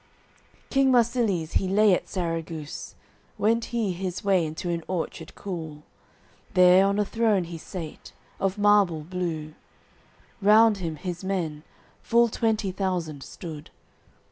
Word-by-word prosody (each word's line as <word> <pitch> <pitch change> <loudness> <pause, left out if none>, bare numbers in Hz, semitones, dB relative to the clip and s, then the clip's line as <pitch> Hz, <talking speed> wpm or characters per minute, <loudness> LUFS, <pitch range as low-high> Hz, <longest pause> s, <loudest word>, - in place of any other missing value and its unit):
AOI. - - -34
II - - -33
King 270 -1 +4
Marsilies 230 -9 +1
he 190 - +1
lay 205 +1 +4
at - - -1
Sarraguce, 165 -4 -4 0.4
Went 225 +2 +2
he 230 -5 -1
his 180 0 -4
way 195 -3 +3
into 165 +3 -4
an 170 -1 -2
orchard 170 -2 -4
cool; 160 -6 -6 0.7
There 180 +1 +7
on 200 +1 0
a 210 - +2
throne 220 -4 +1
he 170 -1 -7
sate, 165 -2 -8 0.3
of 195 +1 0
marble 205 -6 +4
blue, 160 -2 -4 0.9
Round 215 +1 +6
him 165 -4 -4
his 180 +3 -6
men, 170 -6 -2 0.4
full 235 0 +3
twenty 220 -3 0
thousand, 180 -6 -2
stood. 155 0 -9
185 Hz, 140 wpm, -26 LUFS, 165-205 Hz, 0.9 s, There